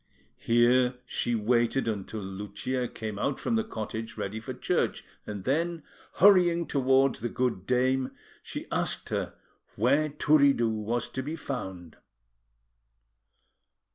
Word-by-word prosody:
Here 125 +2 +3
she 120 -1 -1
waited 120 +3 +1
until 110 0 -3
Lucia 105 +6 -3
came 110 -3 -6
out 140 - -1
from 235 - 0
the 225 - +2
cottage, 110 - -6
ready 105 +3 -3
for 110 - -7
church; - - -1 0.2
and 105 -2 -5
then, 165 - 0 0.3
hurrying 180 -4 +5
towards 135 -1 +2
the 120 - -2
good 120 -8 -1
dame, 130 +1 +2 0.3
she - - -6
asked - - -1
her - - -2 0.4
where 145 +8 +2
Turiddu 140 -4 +4
was 110 +2 -2
to 130 - -4
be 150 +5 -4
found. 95 - -6
125 Hz, 125 wpm, -28 LUFS, 110-140 Hz, 0.4 s, hurrying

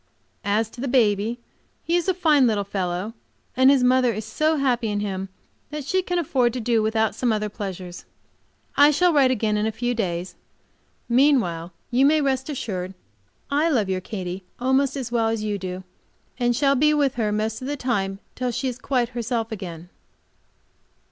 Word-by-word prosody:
As 210 +2 +1
to 240 - -9
the 275 - -2
baby, 225 -2 +2 0.5
he 335 - 0
is 350 0 0
a 375 - +2
fine 300 -7 +4
little 210 -3 +1
fellow, 190 +1 -3 0.4
and 260 +1 +6
his 275 -2 +4
mother 250 -1 +4
is 215 0 -5
so 310 +8 +1
happy 250 -4 +1
in 205 -1 -1
him 195 -2 -3 0.4
that 300 -1 -5
she 375 +6 +1
can 360 -1 -2
afford 260 -8 +1
to 255 - -3
do 230 -1 +1
without 220 0 +1
some 240 +2 0
other 215 -1 -1
pleasures. 185 -4 -7 0.7
I 290 +1 +7
shall 345 +4 +3
write 275 -3 +5
again 215 -4 +1
in 210 +1 0
a - - 0
few 245 +3 -2
days. 180 -5 -3 0.7
Meanwhile, 235 - +2 0.2
you 250 +2 +3
may 310 +1 +4
rest 265 -1 0
assured 190 -9 -4
that - - -35 0.6
I 300 +4 +2
love 225 -10 +1
your 185 -1 -1
Katy 185 -1 -5 0.2
almost 265 +2 +1
as 250 -3 -4
well 230 -2 +2
as 225 -1 -1
you 205 -1 -2
do, 185 0 -5 0.6
and 240 -1 +2
shall 275 +1 +3
be 300 +3 +3
with 285 -3 +2
her 220 -3 -1
most 215 +2 -2
of 255 - -5
the 290 +1 -2
time 195 -7 -1 0.2
till 250 0 -2
she 255 +3 -2
is 250 -1 -4
quite 250 -3 0
herself 235 -1 -2
again. 175 -5 -7
235 Hz, 190 wpm, -23 LUFS, 205-270 Hz, 0.7 s, I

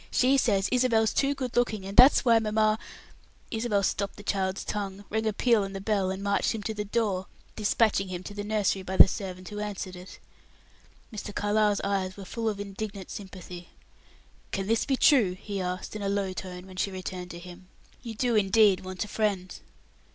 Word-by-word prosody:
She 260 +2 +3
says 200 -6 +2
Isabel's 235 -3 +3
too 280 0 +1
good 255 -3 -4
looking, 220 -5 +1
and 195 +1 -6
that's 255 +1 +7
why 230 -2 +6
mamma 215 0 +1 0.4
" - - -31
Isabel 220 -3 0
stopped 200 +1 -1
the 205 - -11
child's 190 -1 -1
tongue, 200 -1 -4
rang 220 +1 0
a - - +2
peal 225 0 +2
on 195 0 -5
the 195 - -4
bell, 195 -2 0
and 190 +1 -4
marched 200 +3 +1
him 215 - -5
to 220 - -2
the 210 -1 -3
door, 205 -3 -1 0.3
dispatching 210 -2 +2
him 185 -1 -5
to 205 - -8
the 205 0 -5
nursery 205 -2 0
by 190 0 -4
the - - +10
servant 185 -1 -6
who 210 -1 -6
answered 200 -3 -5
it. 180 +1 -11 1.0
Mr. 205 -1 -6
Carlyle's 210 0 +2
eyes 195 -1 -1
were 195 - -8
full 225 +3 -2
of 205 -2 -4
indignant 200 -1 -6
sympathy. 180 -3 -9 0.8
"Can 195 - -2
this 225 +2 +1
be 270 - +1
true?" 240 -13 +5
he 200 -2 -4
asked, 180 +3 -4
in 210 - -5
a 200 - -1
low 200 -2 -1
tone 180 -1 -7
when 185 -1 -12
she 200 - 0
returned 185 -1 -6
to 170 - -8
him. 180 +1 -12 0.3
"You 230 -2 -7
do, 240 +1 +1
indeed, 205 -1 +4
want 185 +1 -5
a - - -11
friend." 200 -4 -1
200 Hz, 205 wpm, -28 LUFS, 190-220 Hz, 1.0 s, the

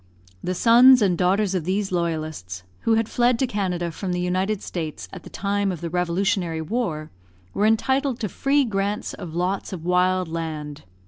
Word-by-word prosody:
The 185 - -2
sons 245 +5 +7
and 185 -3 +2
daughters 190 +3 +1
of 185 -4 -1
these 190 +3 -1
loyalists, 155 - -3 0.2
who 225 - +2
had 225 -1 +1
fled 245 0 +2
to 265 - +1
Canada 180 -6 -2
from 180 +2 -4
the 180 - -1
United 185 +3 -1
States 160 -4 -5
at 185 - -8
the - - -12
time 200 0 -1
of 175 - -5
the 170 0 -5
revolutionary 180 -1 0
war, 160 -4 -3 0.4
were 210 - +2
entitled 265 +3 +1
to 215 - 0
free 275 +8 +1
grants 205 -1 -2
of 170 -5 -8
lots 180 +3 -1
of 170 -3 -7
wild 180 0 +2
land. 155 - -5
185 Hz, 180 wpm, -23 LUFS, 170-210 Hz, 0.4 s, sons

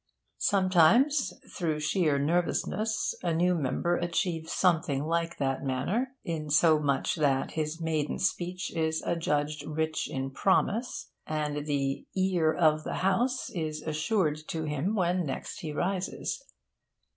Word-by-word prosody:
Sometimes, 205 - +4 0.2
through 160 -5 -1
sheer 155 -1 +2
nervousness, 175 +8 0
a 170 -2 0
new 180 +2 +3
member 170 +3 0
achieves 170 -1 -1
something 165 -6 +2
like 170 +1 -1
that 135 -1 -1
manner; 185 - -1
insomuch 150 -2 +2
that 135 -3 +1
his 155 +1 -3
maiden 155 -2 -1
speech 180 -1 -2
is 160 -1 0
adjudged 150 -3 -1
rich 155 +1 -2
in 135 0 -3
promise, 205 - 0 0.2
and 150 -1 -2
'the 140 -2 -1
ear 185 -4 +2
of 155 -2 +3
the - - -3
House' 245 +7 +1
is 155 -3 -3
assured 155 +1 0
to 160 -1 -3
him 150 +7 -1
when 180 -2 +1
next 150 +7 -5
he 160 -6 -5
rises. 190 - -2
160 Hz, 125 wpm, -29 LUFS, 150-180 Hz, 0.2 s, Sometimes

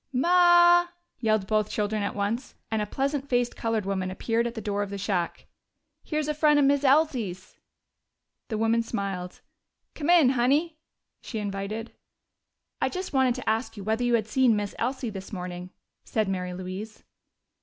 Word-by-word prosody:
"Ma!" 345 +4 +5 0.3
yelled 215 -4 +1
both 215 +1 +1
children 210 0 -1
at 200 - -2
once, 210 +5 -2 0.2
and 220 -1 0
a 210 - -2
pleasant 275 +4 -2
faced 245 -1 +1
colored 225 -3 -1
woman 190 -1 -2
appeared 230 +5 -1
at 235 - -6
the - - -4
door 205 -1 -2
of 205 - -3
the 200 - -5
shack. 190 -3 -2 0.6
"Here's 305 -1 -2
a 300 - 0
frien' 300 0 +4
of 285 - +4
Miz 285 0 +3
Elsie's!" 260 - +1 0.9
The 220 - -3
woman 225 +1 +2
smiled. 195 -5 -4 0.5
"Come 310 +1 -4
in, 335 -7 +6
Honey," 285 +6 +1 0.4
she 225 - -6
invited. 205 +2 -4 0.9
"I - - +2
just 370 -3 -5
wanted 260 -2 +3
to - - -7
ask 225 +1 -1
you 200 - -6
whether 220 +4 0
you 240 -1 +3
had 220 -3 0
seen 240 +1 +3
Miss 205 -1 -3
Elsie 250 -1 -2
this 195 -1 -8
morning," 180 -2 -6 0.3
said 215 -2 -1
Mary 180 -2 -3
Louise. 185 +4 -7
225 Hz, 170 wpm, -26 LUFS, 200-270 Hz, 0.9 s, in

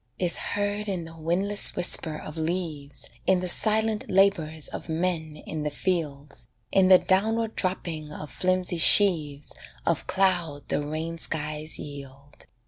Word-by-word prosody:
Is 175 -2 +2
heard 205 +1 -2
in 180 -4 -3
the 165 0 -11
windless 180 +6 +1
whisper 160 -3 +4
of 155 - -9
leaves 160 -3 -3 0.2
In 190 -1 +4
the 180 - -3
silent 220 +3 +2
labours 175 -6 +2
of - - -8
men 160 -2 -2
in 155 -1 -5
the 150 - -2
fields, 150 -4 -3 0.2
In 190 -1 +4
the 185 -1 +8
downward 220 +5 0
dropping 165 -5 -3
of 150 0 -8
flimsy 185 -1 0
sheaves 160 -6 +4 0.3
Of 165 -5 0
cloud 175 -6 0
the - - 0
rain 160 +3 -5
skies 155 0 -2
yield. 140 -1 -11
165 Hz, 140 wpm, -26 LUFS, 150-190 Hz, 0.3 s, the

